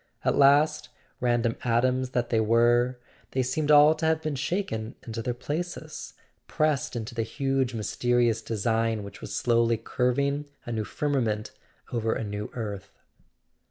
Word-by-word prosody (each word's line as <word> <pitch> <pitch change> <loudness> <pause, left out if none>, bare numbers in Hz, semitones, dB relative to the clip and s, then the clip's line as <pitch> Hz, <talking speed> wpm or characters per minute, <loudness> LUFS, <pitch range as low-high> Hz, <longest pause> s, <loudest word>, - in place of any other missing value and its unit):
At - - +3
last, 145 -1 +4 0.3
random 120 -1 +1
atoms 125 +2 +1
that 120 -2 -2
they 115 - +3
were, 120 +3 +3 0.4
they 130 - +1
seemed 145 +4 -1
all 150 +1 +8
to 160 - -3
have 160 0 +2
been 155 - -1
shaken 140 - -2
into 115 -1 -4
their 120 +1 -2
places, 155 +7 -5 0.3
pressed 155 -5 0
into 115 -1 -4
the 115 - -1
huge 135 +1 -1
mysterious 120 +1 +1
design 115 0 0
which 100 - -10
was - - -6
slowly 115 -1 +2
curving 140 +5 0 0.2
a 120 - -5
new 110 -2 -2
firmament 115 -8 -1 0.4
over 115 -1 0
a - - -3
new 105 0 -4
earth. 105 -5 -5
120 Hz, 150 wpm, -27 LUFS, 115-140 Hz, 0.4 s, all